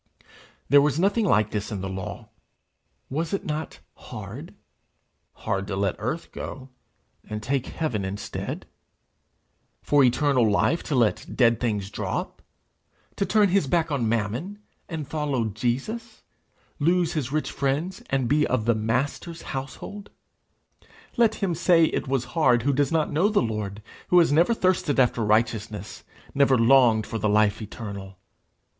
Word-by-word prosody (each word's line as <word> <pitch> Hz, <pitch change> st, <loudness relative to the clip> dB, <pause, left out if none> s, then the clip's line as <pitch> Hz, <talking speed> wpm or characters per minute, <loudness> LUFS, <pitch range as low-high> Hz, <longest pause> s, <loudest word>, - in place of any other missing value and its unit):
There 140 Hz, +2 st, +6 dB
was 145 Hz, +1 st, +1 dB
nothing 205 Hz, +4 st, +2 dB
like 105 Hz, -, +2 dB
this 105 Hz, +1 st, -3 dB
in 100 Hz, -3 st, -4 dB
the 95 Hz, -, -3 dB
law: 95 Hz, -1 st, -6 dB, 0.8 s
was 160 Hz, +5 st, -3 dB
it -, -, -6 dB
not 155 Hz, +1 st, -4 dB
hard? -, -, -9 dB, 0.8 s
Hard 100 Hz, 0 st, -3 dB
to 100 Hz, -, -3 dB
let 100 Hz, -1 st, 0 dB
earth 125 Hz, +10 st, -4 dB
go, 130 Hz, -1 st, -7 dB, 0.5 s
and 105 Hz, 0 st, -6 dB
take 135 Hz, +2 st, -1 dB
heaven 125 Hz, -11 st, -2 dB
instead? 100 Hz, +2 st, -5 dB, 1.2 s
for 145 Hz, -1 st, +4 dB
eternal 125 Hz, -2 st, +3 dB
life, 145 Hz, +10 st, +2 dB
to 150 Hz, -, -1 dB
let 115 Hz, -4 st, +1 dB
dead 115 Hz, -3 st, +4 dB
things 105 Hz, -5 st, -2 dB
drop? -, -, -4 dB, 0.7 s
to 195 Hz, -, -1 dB
turn 210 Hz, -2 st, +4 dB
his 185 Hz, -5 st, +2 dB
hack 165 Hz, +2 st, +1 dB
on 125 Hz, -6 st, 0 dB
Mammon, 115 Hz, -, -2 dB, 0.3 s
and 160 Hz, -5 st, -5 dB
follow 145 Hz, -6 st, -1 dB
Jesus? 135 Hz, -, -3 dB, 0.6 s
lose 170 Hz, +2 st, +2 dB
his 140 Hz, -5 st, -2 dB
rich 155 Hz, +1 st, -1 dB
friends, 145 Hz, +7 st, -2 dB
and 130 Hz, -2 st, 0 dB
he 150 Hz, +1 st, +3 dB
of 120 Hz, -4 st, 0 dB
the 115 Hz, -, +4 dB
Master's 130 Hz, +9 st, -2 dB
household? 135 Hz, +10 st, -7 dB, 1.1 s
Let 235 Hz, -2 st, +3 dB
him 195 Hz, -4 st, -1 dB
say 165 Hz, 0 st, +4 dB
it -, -, -2 dB
was 135 Hz, -2 st, 0 dB
hard 125 Hz, -8 st, +3 dB
who 140 Hz, +2 st, +2 dB
does 140 Hz, 0 st, +1 dB
not 160 Hz, -2 st, +1 dB
know 165 Hz, +8 st, +2 dB
the 210 Hz, -, +2 dB
Lord, 105 Hz, -2 st, -4 dB, 0.2 s
who 180 Hz, -, +4 dB
has 170 Hz, -4 st, +5 dB
never 170 Hz, +10 st, +4 dB
thirsted 185 Hz, -7 st, +1 dB
after 120 Hz, -2 st, +3 dB
righteousness, 110 Hz, -1 st, -1 dB, 0.3 s
never 135 Hz, -2 st, +4 dB
longed 115 Hz, -2 st, +5 dB
for 115 Hz, -, -4 dB
the 105 Hz, -, +1 dB
life 105 Hz, +1 st, +2 dB
eternal! 100 Hz, -3 st, -8 dB
135 Hz, 150 wpm, -25 LUFS, 110-160 Hz, 1.2 s, There